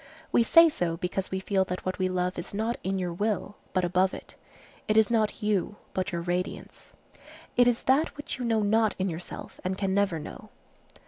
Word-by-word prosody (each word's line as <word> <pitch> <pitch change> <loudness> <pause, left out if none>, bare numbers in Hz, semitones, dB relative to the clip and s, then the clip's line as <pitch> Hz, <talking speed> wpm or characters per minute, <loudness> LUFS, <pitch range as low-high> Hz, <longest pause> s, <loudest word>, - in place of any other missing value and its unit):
We - - +4
say 330 +8 +7
so 175 - -1
because 185 +2 -3
we 190 - -2
feel 190 0 +1
that 180 0 -5
what 185 +1 -2
we 185 0 +1
love 180 0 -1
is 175 - -6
not 225 +3 -1
in 190 +1 -1
your 180 -2 -2
will, 205 +2 -2
but 185 -1 +1
above 185 +2 +2
it. - - -11 0.5
It 215 - +2
is 220 0 +5
not 220 -1 +1
you, 205 -1 0 0.2
but 185 -1 -1
your 170 -1 -2
radiance. 180 +1 -4 0.6
It 245 0 +5
is 240 -1 +1
that 280 +5 +2
which 290 -2 -6
you - - -3
know 225 -2 +2
not 220 +1 +2
in 190 0 0
yourself 170 +1 -8
and 185 +1 -2
can 195 -1 0
never 200 -4 +2
know. 150 - -9
195 Hz, 205 wpm, -28 LUFS, 180-220 Hz, 0.6 s, say